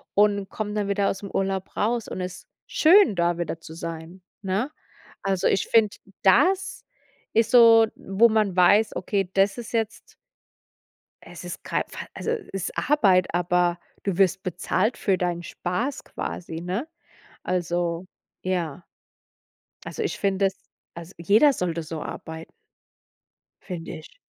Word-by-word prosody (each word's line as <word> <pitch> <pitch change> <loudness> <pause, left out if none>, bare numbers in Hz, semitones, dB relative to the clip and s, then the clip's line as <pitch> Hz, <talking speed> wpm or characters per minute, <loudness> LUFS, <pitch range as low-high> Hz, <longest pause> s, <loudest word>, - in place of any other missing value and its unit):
und 200 -1 +3
komm 210 -1 -4
dann 205 -1 -1
wieder 200 0 +1
ausm 195 0 -5
Urlaub 195 -1 -2
raus 230 +1 0
und 185 - -5
ist 180 -1 -7 0.2
schön, 345 - +5
da 170 -1 +1
wieder 165 -1 -3
zu 160 - -10
sein, 165 +2 -7 0.2
ne? 200 +8 -1 0.5
Also, 195 -1 +1
ich 195 - +1
find, 220 -3 +3 0.3
das 365 - +3 0.5
ist 225 0 +2
so, 230 -2 +8
wo 205 +5 +3
man 215 -4 +1
weiß: 200 +4 +4
„Okay, 195 -3 -1
das 195 +2 +2
ist 240 0 -8
jetzt 225 0 -3 1.1
Es - - -11
ist - - -7
kei - - 0
Fall - - -8
also, - - -3 0.2
ist 195 -3 -4
Arbeit, 195 -11 +3
aber 175 0 +1 0.2
du 195 -3 -2
wirst 190 -1 +3
bezahlt 185 +5 -1
für 195 -2 +1
deinen 175 -1 -1
Spaß 230 +12 -3
quasi, 165 -2 -6
ne?“ 185 - -3 0.6
Also, 175 0 -1 0.3
ja 175 -2 -3 1.0
Also - - -4
ich 415 - -2
finde 195 0 +1
es 195 - -3 0.4
als 170 +2 -10
jeder 210 - +5
sollte 170 -7 -2
so 155 -1 -6
arbeit 160 0 -7 1.1
find' 170 -3 -7
ich. 155 - -9
190 Hz, 140 wpm, -25 LUFS, 175-215 Hz, 1.1 s, so